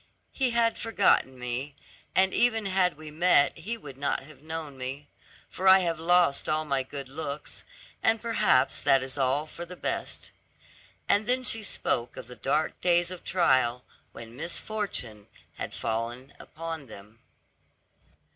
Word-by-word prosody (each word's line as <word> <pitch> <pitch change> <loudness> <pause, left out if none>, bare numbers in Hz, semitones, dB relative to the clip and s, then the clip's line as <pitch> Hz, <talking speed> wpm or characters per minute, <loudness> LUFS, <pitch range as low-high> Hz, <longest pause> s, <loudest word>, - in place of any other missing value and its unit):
He 265 -2 0
had 235 -1 +2
forgotten 205 - +2
me, 125 +3 -4 0.4
and 190 0 +4
even 225 -3 +2
had 185 -4 +1
we 155 -1 -9
met 160 -2 +4
he 210 +8 -5
would 140 - -11
not 140 -1 -1
have 145 -1 -15
known 155 -2 -6
me, 135 +3 -6 0.4
for 190 - -3
I 190 0 +10
have 165 -3 -1
lost 170 -4 +3
all 155 0 +1
my 140 -2 +1
good 135 +1 -7
looks, 145 +1 -6 0.4
and 225 0 +3
perhaps 140 - +2
that 135 -1 +4
is 130 0 -7
all 135 +2 +1
for 165 +2 -8
the 175 +1 -9
best." - - -4 0.8
And 205 +1 +3
then 255 +1 +1
she 225 -3 +2
spoke 125 - -1
of - - -7
the 125 +1 -11
dark 150 +5 -1
days 175 0 +3
of 185 - -7
trial, 130 -8 +2 0.3
when 115 0 -11
misfortune 160 - -3 0.3
had - - -5
fallen 120 +4 -4
upon 160 -3 -7
them. 105 +1 -13
155 Hz, 155 wpm, -28 LUFS, 130-185 Hz, 0.8 s, I